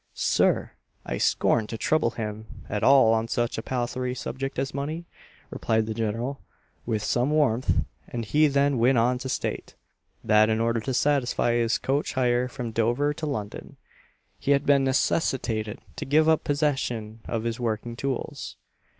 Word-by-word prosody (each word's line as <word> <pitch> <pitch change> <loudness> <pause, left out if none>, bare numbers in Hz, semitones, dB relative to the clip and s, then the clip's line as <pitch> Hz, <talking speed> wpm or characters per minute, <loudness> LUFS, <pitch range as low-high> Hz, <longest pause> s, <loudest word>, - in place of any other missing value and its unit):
"Sir! - - +2 0.3
I - - -3
scorned 110 -2 +2
to 115 - -4
trouble 155 +1 +2
him 110 -1 -6 0.2
at 105 0 -2
all 135 -5 +6
on 110 0 0
such 120 -1 -1
a - - -3
palthry 125 +1 -2
subject 135 +2 -5
as 135 +1 -2
money," 155 +5 -4 0.5
replied 110 -1 0
the 110 - -3
general, 115 +5 -3 0.5
with 110 -3 -1
some 125 +5 +1
warmth; 140 -6 +2 0.2
and 120 -2 -4
he 150 +8 +4
then 140 -2 +2
went 125 +2 +4
on 125 +2 +2
to 130 - -5
state, - - -3 0.5
that 110 0 +4
in 110 0 +1
order 115 0 +1
to 130 +4 -3
satisfy 130 -3 +1
his 120 -1 +2
coach 140 +2 -1
hire 125 -1 +1
from 125 -2 -5
Dover 120 +6 +1
to 155 +1 -5
London, 105 -8 -5 0.6
he 140 - -4
had 140 -1 +3
been 140 -1 +4
necessitated 130 -5 0 0.2
to - - -4
give 155 +3 +3
up 160 -1 +3
possession 135 -7 -1
of 115 -1 -2
his 115 0 -3
working 115 0 -2
tools. 135 0 -4
120 Hz, 165 wpm, -26 LUFS, 115-140 Hz, 0.6 s, all